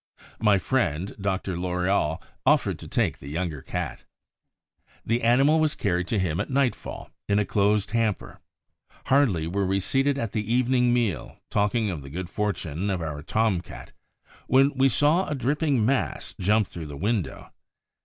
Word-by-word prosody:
My 105 -2 +4
friend 95 - -1
Dr. 95 -1 -1
Loriol 90 -2 0 0.2
offered - - +2
to - - -9
take - - 0
the 70 - -11
younger 80 -2 -3
cat. - - -5 1.0
The 115 +2 +1
animal 135 +7 +4
was 155 -1 +1
carried 90 -3 -1
to 110 - 0
him 85 -4 0
at - - -2
nightfall 135 -2 -1 0.2
in 100 - +3
a 105 - +2
closed 105 0 +1
hamper. 115 -4 -1 0.7
Hardly 125 - +3
were 95 +3 -1
we 95 +1 +1
seated 135 +7 +1
at 115 -6 -2
the 110 0 -3
evening 125 0 +3
meal, 120 -7 -1
talking 105 +1 +1
of 80 -5 -5
the 70 - -10
good 90 +4 -6
fortune 100 -3 -2
of 95 -2 0
our 75 -3 -4
Tom 105 +2 +1
cat, - - -11 0.6
when 135 +2 +4
we 135 +1 +4
saw 150 +8 +2
a 150 - -2
dripping 140 -2 +1
mass 130 +2 -1
jump 105 +3 +3
through 85 -3 -8
the 70 -1 -8
window. 100 - -2
105 Hz, 165 wpm, -25 LUFS, 90-125 Hz, 1.0 s, My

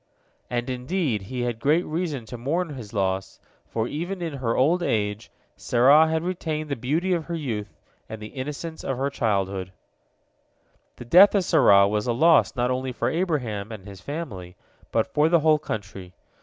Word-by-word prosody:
And, 120 0 -2
indeed, 130 - -1
he 125 +6 -5
had 120 -2 -2
great 155 +8 +2
reason 155 -6 -3
to 125 - -8
mourn 155 +9 -2
his 125 -8 -8
loss, 95 -3 -2 0.3
for 115 0 -2
even 175 +7 -4
in 165 -3 -4
her 125 -4 -2
old 165 +7 +3
age 105 -7 -1 0.3
Sarah 140 +6 +5
had 160 0 -1
retained 160 -4 -3
the 140 - -1
beauty 155 +10 0
of 165 -3 -1
her 170 - -4
youth 110 -10 -5 0.3
and 110 0 -7
the 105 0 -8
innocence 150 +4 -6
of 135 - -2
her 140 +2 -1
childhood. 100 -6 -1 1.2
The 120 - -10
death 185 - +7
of 200 - +3
Sarah 100 - +5
was 105 +3 -1
a 120 - +1
loss 160 +5 +4
not 125 0 0
only 130 0 -2
for - - -1
Abraham 125 - -2
and 105 -4 -9
his 100 -2 -11
family, 105 - -6 0.4
but - - 0
for 150 +2 +3
the 170 -1 +4
whole 155 0 +4
country. 100 - -7
130 Hz, 180 wpm, -24 LUFS, 110-160 Hz, 1.2 s, death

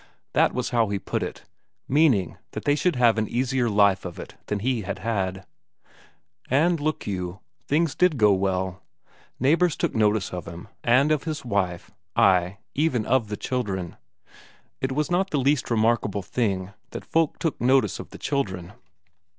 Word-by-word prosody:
That - - +4
was 125 -1 -3
how 115 -3 +2
he 100 - -1
put - - -3
it, - - -5 0.4
meaning 130 - +3 0.2
that - - -6
they 145 - +4
should 160 +2 +1
have 120 -3 +4
an 110 - 0
easier 125 0 0
life 100 -2 +3
of 90 -2 -7
it - - -9
than 105 - -1
he 120 +3 0
had 95 - -4
had. 95 -4 -2 1.0
And 160 +6 +3
look 155 +1 -2
you, 90 -1 -4 0.3
things 155 0 +2
did 180 -5 +2
go 105 -3 +5
well; 95 -1 -1 0.6
neighbours 160 +5 +3
took - - -1
notice 105 -3 +1
of 90 -2 -5
him, 85 +5 -9
and 130 +6 +4
of 155 -1 +1
his 155 -4 -4
wife 95 -6 -1 0.2
ay, 90 0 +3 0.2
even 135 -7 +1
of 125 -3 +2
the 105 0 -4
children. 95 -9 -3 0.9
It 130 - -1
was 150 +4 -1
not 190 +2 +1
the 150 - 0
least 140 0 +1
remarkable 110 -3 +1
thing, 100 -4 -2 0.2
that - - -6
folk 165 -2 +1
took 165 - -2
notice 130 +2 +3
of - - -8
the - - -10
children. 95 -10 -3
115 Hz, 170 wpm, -25 LUFS, 95-140 Hz, 1.0 s, go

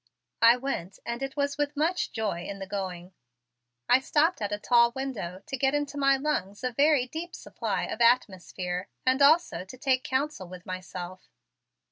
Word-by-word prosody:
I 230 +1 +7
went 220 -8 -4
and 235 +2 -4
it 270 +1 -4
was 280 0 -1
with 290 0 -1
much 340 +4 0
joy 210 -6 -2
in 200 - -5
the 195 - -6
going. 185 -2 -5 0.7
I 250 - +6
stopped 305 +3 +1
at 205 - -2
a 205 - -1
tall 235 +2 +4
window 210 -9 -5
to - - -4
get 270 +2 +1
into 290 -1 -2
my 275 -1 +3
lungs 260 -9 -2
a 255 - 0
very 280 +1 +3
deep 325 +7 -6
supply - - -3
of - - -4
atmosphere 190 -6 +1 0.2
and 260 +2 +3
also 310 - +4
to 190 +7 -12
take 260 0 +1
counsel 265 -7 -2
with 180 0 -11
myself. 185 0 -7
250 Hz, 175 wpm, -28 LUFS, 190-280 Hz, 0.7 s, I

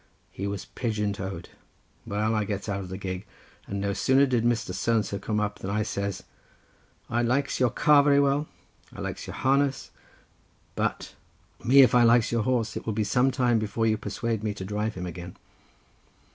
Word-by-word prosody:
he 100 - -4
was 100 -1 -4
pigeon 105 -4 -2
toed. 95 -3 -6 0.6
Well, 105 +2 0
I 105 -1 +1
gets 100 0 -4
out 100 -1 -2
of 95 -2 -7
the 95 - -5
gig, 95 -1 -5 0.4
and 100 - -3
no 100 0 -1
sooner 135 +6 +4
did 125 -4 +1
Mr. 120 -5 0
So 115 +5 0
and 110 - +2
so 100 - -4
come 105 +1 -1
up 105 -1 -2
than 95 - -5
I 105 +2 0
says— 100 -2 -3 0.8
"'I 120 - 0
likes 135 +4 0
your 125 -2 +4
car 150 +2 +5
very 140 0 +4
well, 140 +2 +2 0.4
and - - -15
I - - -6
likes - - -5
your - - -7
harness, 135 0 +1 0.8
but - - -2 0.3
— - - -28
me 135 +3 +7
if 130 - +3
I 125 - +6
likes 115 -1 +4
your 115 -1 +1
horse, 115 -2 0
and - - -3
it - - -20
will 110 - 0
be 110 +1 0
some 125 +5 +2
time 125 -3 +2
before 110 +1 -1
you 110 -1 +3
persuade 110 +1 -3
me 105 -2 -2
to 95 - -6
drive 105 +2 -2
him 90 -1 -5
again. 90 0 -8
110 Hz, 210 wpm, -26 LUFS, 100-125 Hz, 0.8 s, me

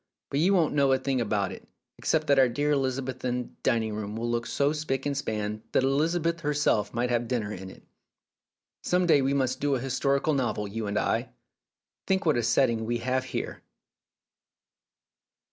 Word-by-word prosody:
But 140 - 0
you 190 +5 +4
won't 165 -4 +2
know 140 -2 +3
a - - +4
thing 130 -1 -1
about 105 -3 0
it, - - -10 0.3
except 155 -1 +1
that 140 -2 +4
our 130 -2 +5
dear 145 +5 0
Elizabethan 130 -2 -2
dining 110 -2 +1
room 105 0 -4
will 115 +1 -2
look 120 0 -1
so 140 +1 +1
spick 140 -4 -2
and 145 -1 -1
span 110 -5 -3
that - - +3
Elizabeth 165 +5 +1
herself 145 -9 +1
might 120 +1 -1
have 120 -1 0
dinner 115 -5 -2
in 95 0 -7
it. - - -14 1.0
Some 180 0 +2
day 160 -5 +5
we 135 +1 +1
must 130 -1 0
do 145 -1 +1
an 125 - -3
historical 140 +3 +1
novel, 120 -6 -1
you 110 +1 -4
and 100 0 -1
I. - - 0 0.8
Think 190 -1 +1
what 155 - +3
a 120 - +2
setting 115 -1 +2
we 120 0 0
have 130 +2 -1
here - - -4
130 Hz, 180 wpm, -27 LUFS, 115-145 Hz, 1.0 s, our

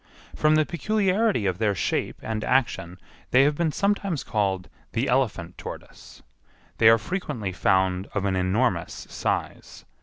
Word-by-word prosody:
From 155 0 +3
the 155 0 +3
peculiarity 200 - +1
of 95 -1 -1
their 105 -3 +1
shape - - -1
and 110 -1 -3
action 105 -9 0 0.3
they 130 +2 +5
have 145 +2 +3
been 160 +1 0
sometimes 200 -4 0
called 95 -4 -1 0.3
the 120 +4 0
elephant 105 -9 -1
tortoise. - - -10 0.6
They 110 - +7
are 115 - +7
frequently 115 - -4
found 95 0 +1
of 100 -1 0
an 95 -1 +1
enormous 95 0 0
size. - - -3
115 Hz, 145 wpm, -25 LUFS, 95-155 Hz, 0.6 s, They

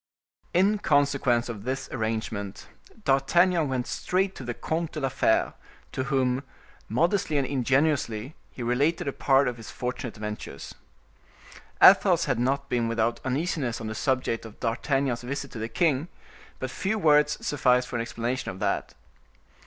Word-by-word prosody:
In 200 +4 +3
consequence 140 - +2
of 110 -4 -6
this 130 +3 -3
arrangement, 110 -3 -3 0.4
D'Artagnan 160 +3 +3
went 130 -2 -1
straight 190 +6 -1
to - - -9
the 120 -1 -4
Comte 165 0 -3
de 155 - -3
la 135 -2 0
Fere, 110 - +2 0.4
to 130 - -3
whom, 130 -2 +1 0.5
modestly 165 - +1
and 140 - +2
ingenuously, 130 -2 0 0.2
he 125 - -7
related 140 +7 +1
a 140 - -1
part 135 0 +3
of 120 -1 -2
his 115 - -10
fortunate 125 -1 -4
adventures. 105 0 -6 1.1
Athos - - +7
had - - 0
not 135 +3 0
been 120 -2 0
without 115 0 0
uneasiness 135 -3 -1
on 115 - -6
the 110 - -3
subject 130 -1 -1
of 110 -2 -12
D'Artagnan's 130 +1 0
visit 140 +2 -5
to 115 - -7
the 110 +1 -3
king; 155 -1 +1 0.5
but - - -4
few 205 +3 -1
words 150 -4 +4
sufficed 125 -3 +2
for - - -6
an 115 - 0
explanation 120 +2 -3
of 95 - -6
that. 105 - -2
130 Hz, 155 wpm, -26 LUFS, 120-145 Hz, 1.1 s, Athos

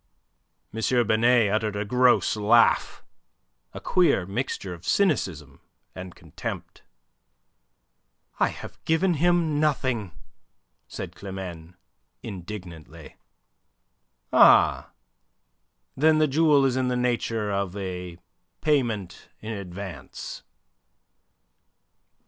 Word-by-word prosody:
M. 110 - -5 0.3
Binet 115 0 +3
uttered 110 -1 -1
a 100 +1 -2
gross 125 +2 +3
laugh, 110 +2 +3 0.7
a - - -8
queer 165 - +2
mixture 100 -2 -4
of 85 0 -12
cynicism 95 - -1 0.3
and 90 -1 -9
contempt. - - -8 1.6
"I - - +4
have - - -10
given 165 -2 +1
nothing," 130 - -1 0.7
said - - -7
Climene, 90 -4 -8 0.5
indignantly. 90 -5 -9 1.2
"Ah! - - +5 1.1
Then 155 +3 +4
the 155 0 +3
jewel 145 -1 +3
is 130 -2 +1
in 130 -1 0
the 125 0 0
nature 115 -3 -1
of 100 -1 -2
a 90 -3 -6 0.4
payment 120 - -1
in 110 - -7
advance." 95 -2 -8
110 Hz, 90 wpm, -25 LUFS, 95-135 Hz, 1.6 s, Ah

